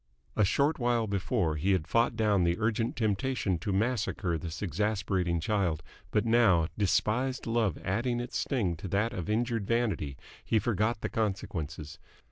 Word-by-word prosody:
A -, -, +3 dB
short 140 Hz, +10 st, +2 dB
while 120 Hz, -2 st, +2 dB
before, 100 Hz, -5 st, 0 dB
he 95 Hz, +6 st, +2 dB
had 90 Hz, -5 st, 0 dB
fought 115 Hz, +6 st, +2 dB
down 105 Hz, -4 st, +2 dB
the 85 Hz, 0 st, +2 dB
urgent 115 Hz, +1 st, 0 dB
temptation 105 Hz, -4 st, 0 dB
to 100 Hz, -, -3 dB
massacre 105 Hz, -4 st, 0 dB
this 80 Hz, +3 st, -5 dB
exasperating 95 Hz, -2 st, 0 dB
child, 85 Hz, -4 st, 0 dB, 0.3 s
but 105 Hz, -, +1 dB
now, 110 Hz, -8 st, +4 dB
despised 115 Hz, +6 st, +1 dB
love 115 Hz, -7 st, +1 dB
adding 120 Hz, +5 st, 0 dB
its 120 Hz, 0 st, -5 dB
sting 105 Hz, -, 0 dB
to 90 Hz, -, -6 dB
that 105 Hz, +6 st, 0 dB
of 90 Hz, -4 st, -4 dB
injured 115 Hz, -1 st, 0 dB
vanity, 105 Hz, -, 0 dB, 0.3 s
he 110 Hz, -, +1 dB
forgot 110 Hz, +1 st, 0 dB
the -, -, -2 dB
consequences. 85 Hz, -8 st, -3 dB
105 Hz, 155 wpm, -30 LUFS, 90-115 Hz, 0.3 s, now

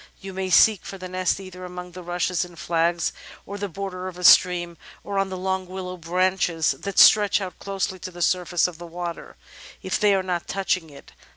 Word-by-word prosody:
You 195 Hz, 0 st, -8 dB
may 190 Hz, 0 st, -3 dB
seek 210 Hz, +2 st, +5 dB
for 195 Hz, -, -8 dB
the 185 Hz, -1 st, -7 dB
nest 185 Hz, +1 st, -1 dB
either 185 Hz, -1 st, -10 dB
among 180 Hz, 0 st, -8 dB
the 180 Hz, +1 st, -9 dB
rushes 175 Hz, +1 st, -1 dB
and 175 Hz, -1 st, -11 dB
flags 170 Hz, 0 st, 0 dB, 0.3 s
at 200 Hz, 0 st, -6 dB
the 205 Hz, 0 st, -3 dB
border 185 Hz, +1 st, -5 dB
of 180 Hz, -1 st, -8 dB
a 180 Hz, -, -8 dB
stream 175 Hz, -1 st, +5 dB, 0.3 s
or 200 Hz, -1 st, -2 dB
on 195 Hz, 0 st, 0 dB
the 185 Hz, -, -5 dB
long 190 Hz, 0 st, -2 dB
willow 185 Hz, 0 st, -6 dB
branches 180 Hz, -1 st, +1 dB
that 200 Hz, 0 st, -6 dB
stretch 210 Hz, -1 st, +7 dB
out 190 Hz, -2 st, -7 dB
close 195 Hz, -1 st, -2 dB
to 190 Hz, -1 st, -7 dB
the 175 Hz, 0 st, -9 dB
surface 180 Hz, -1 st, +1 dB
of 175 Hz, -2 st, -10 dB
the 175 Hz, -, -8 dB
water, 170 Hz, 0 st, -6 dB, 0.5 s
if -, -, -1 dB
they 205 Hz, -2 st, +4 dB
are 190 Hz, -, 0 dB
not 180 Hz, -2 st, -3 dB
touching 185 Hz, -3 st, -1 dB
it. 140 Hz, -, -15 dB
185 Hz, 210 wpm, -24 LUFS, 175-190 Hz, 0.5 s, stretch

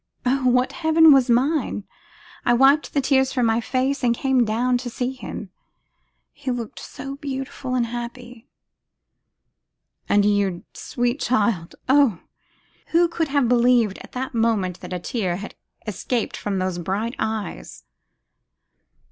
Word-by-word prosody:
Oh! 255 Hz, 0 st, +2 dB
what 250 Hz, +1 st, +2 dB
heaven 320 Hz, -2 st, +5 dB
was 265 Hz, -2 st, +4 dB
mine! 255 Hz, -2 st, +1 dB, 0.6 s
I 240 Hz, -, +3 dB
wiped 275 Hz, +4 st, +4 dB
the 280 Hz, -, +3 dB
tears 265 Hz, -1 st, +2 dB
from 250 Hz, -3 st, +1 dB
my 225 Hz, +1 st, +2 dB
face 260 Hz, +3 st, -1 dB
and 235 Hz, -1 st, +3 dB
came 265 Hz, 0 st, +2 dB
down 245 Hz, +3 st, +1 dB
to 245 Hz, 0 st, -5 dB
see 245 Hz, +2 st, -2 dB
him. 220 Hz, -6 st, -8 dB, 0.8 s
He 280 Hz, -2 st, -7 dB
looked 240 Hz, -3 st, -4 dB
so 275 Hz, 0 st, -8 dB
beautiful 270 Hz, -2 st, -4 dB
and 245 Hz, -2 st, +2 dB
happy!' 240 Hz, +1 st, -8 dB, 1.6 s
'And 205 Hz, 0 st, +4 dB
you, 200 Hz, -4 st, +1 dB
sweet 245 Hz, +2 st, -2 dB
child, 210 Hz, -8 st, 0 dB
oh! 265 Hz, -, +4 dB, 0.7 s
who 340 Hz, +1 st, +3 dB
could 330 Hz, -1 st, -1 dB
have 280 Hz, -3 st, +1 dB
believed, 240 Hz, -4 st, +3 dB
at -, -, -13 dB
that 260 Hz, +1 st, -4 dB
moment, 220 Hz, -6 st, 0 dB
that -, -, -10 dB
a 180 Hz, -, -2 dB
tear 180 Hz, 0 st, -2 dB
had 200 Hz, +4 st, -7 dB, 0.3 s
escaped 225 Hz, +2 st, -2 dB
from 200 Hz, -2 st, -3 dB
those 185 Hz, -1 st, -2 dB
bright 200 Hz, +7 st, -2 dB
eyes! 210 Hz, -, -4 dB
245 Hz, 140 wpm, -22 LUFS, 215-265 Hz, 1.6 s, heaven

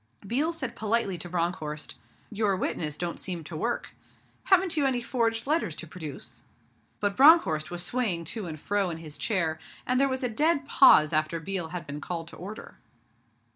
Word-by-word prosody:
Biel 280 Hz, -, +1 dB
said 315 Hz, -7 st, -5 dB
politely 220 Hz, -3 st, 0 dB
to 175 Hz, -, -6 dB
Bronckhorst, 165 Hz, -3 st, -2 dB, 0.4 s
'Your 210 Hz, -2 st, +1 dB
witnesses 150 Hz, -5 st, -2 dB
don't 175 Hz, -1 st, -3 dB
seem 175 Hz, -3 st, -3 dB
to 160 Hz, +2 st, -8 dB
work. 235 Hz, +10 st, -2 dB, 0.5 s
Haven't 375 Hz, -3 st, +4 dB
you 290 Hz, -3 st, +2 dB
any 255 Hz, -2 st, 0 dB
forged 230 Hz, -1 st, -1 dB
letters 290 Hz, -, 0 dB
to 170 Hz, -, -7 dB
produce?' 155 Hz, -3 st, -8 dB, 0.6 s
But 205 Hz, -1 st, 0 dB
Bronckhorst 260 Hz, -, +6 dB
was 175 Hz, 0 st, -2 dB
swaying 190 Hz, -7 st, 0 dB
to 215 Hz, -6 st, -5 dB
and 155 Hz, -2 st, -6 dB
fro 200 Hz, +3 st, 0 dB
in 165 Hz, -, -4 dB
his 155 Hz, -2 st, -8 dB
chair, 165 Hz, -7 st, 0 dB, 0.3 s
and 255 Hz, 0 st, +1 dB
there 275 Hz, -, +3 dB
was 260 Hz, 0 st, -3 dB
a -, -, +2 dB
dead 290 Hz, +5 st, +1 dB
pause 155 Hz, -, +6 dB
after 155 Hz, +2 st, +1 dB
Biel 175 Hz, 0 st, -2 dB
had 170 Hz, 0 st, -6 dB
been 145 Hz, +1 st, -6 dB
called 165 Hz, +1 st, -5 dB
to -, -, -12 dB
order. 205 Hz, +5 st, -9 dB
190 Hz, 180 wpm, -28 LUFS, 165-245 Hz, 0.6 s, Bronckhorst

